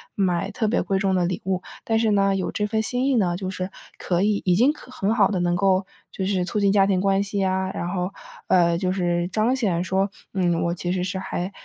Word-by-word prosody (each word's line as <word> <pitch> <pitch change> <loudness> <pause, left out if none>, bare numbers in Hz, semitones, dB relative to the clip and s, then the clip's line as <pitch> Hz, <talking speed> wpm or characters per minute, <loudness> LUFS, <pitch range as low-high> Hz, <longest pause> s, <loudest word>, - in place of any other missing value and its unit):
买 185 -1 0
特 220 +1 -1
别 220 - +1
贵 195 - 0
重 190 -1 +1
的 180 -1 +2
礼 185 +4 -2
物， 185 -1 -1 0.2
但 225 0 +1
是 220 -2 +2
呢， 195 -1 +3
有 190 - -2
这 210 - -1
份 220 +1 0
心 245 +3 -1
意 275 - +2
呢， 180 -6 +2
就 185 -1 -4
是 185 0 -4 0.3
可 175 -1 0
以 205 0 +1
已 180 -2 +4
经 245 +9 +4
可 255 - -14
很 210 -3 0
好 210 -4 +4
的 195 -3 -1
能 175 0 +1
够 190 0 +2 0.3
就 190 - -3
是 190 -2 0
促 200 - -3
进 200 - +4
家 195 -1 +4
庭 185 -2 +1
关 195 0 +2
系 200 0 -3
呀， 190 0 0
然 175 - -3
后 180 +1 -2 0.3
呃， 170 -2 +4
就 185 0 0
是 175 -2 0
彰 220 +6 +1
显 195 -10 0
说， 190 +2 0 0.2
嗯， 175 -3 +1
我 170 0 0
其 175 0 -3
实 180 -1 -1
是 185 +1 -3
还 185 0 -4
190 Hz, 270 characters per minute, -23 LUFS, 180-205 Hz, 0.3 s, 已